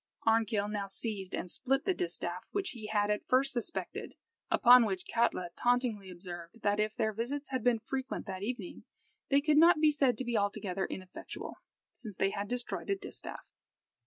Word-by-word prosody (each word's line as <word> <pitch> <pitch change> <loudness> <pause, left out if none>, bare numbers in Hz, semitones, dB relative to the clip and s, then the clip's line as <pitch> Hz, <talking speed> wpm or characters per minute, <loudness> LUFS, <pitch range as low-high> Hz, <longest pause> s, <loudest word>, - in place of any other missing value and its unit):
Arnkill 220 -2 +3
now 205 -1 -3
seized 195 -1 -4
and - - -4
split 270 +9 0
the 380 - +3
distaff, 175 - -1
which 395 -1 -1
he 220 -4 -7
had 210 -1 +1
at 210 - -1
first 265 +2 +3
suspected, 245 +7 -4 0.3
upon 250 0 +8
which 190 -4 -2
Kalta 185 -7 0
tauntingly 240 -5 +1
observed, 175 +3 -9
that 205 0 +2
if 215 0 0
their 220 -3 0
visits 270 +7 -3
had 260 -3 -1
been 245 -2 +4
frequent 265 +4 -4
that 190 -2 -5
evening, 215 -3 -5 0.5
they 280 0 +4
could 300 0 +3
not 330 0 +7
be 310 -1 +5
said 270 -6 +2
to 260 - -3
be 240 -1 -1
altogether 200 -2 -1
ineffectual, 185 -1 -7 0.4
since 215 -5 -9
they 195 +2 +1
had 200 0 -3
destroyed 245 +2 -4
a 395 - +3
distaff. 390 0 -6
220 Hz, 180 wpm, -32 LUFS, 200-255 Hz, 0.5 s, upon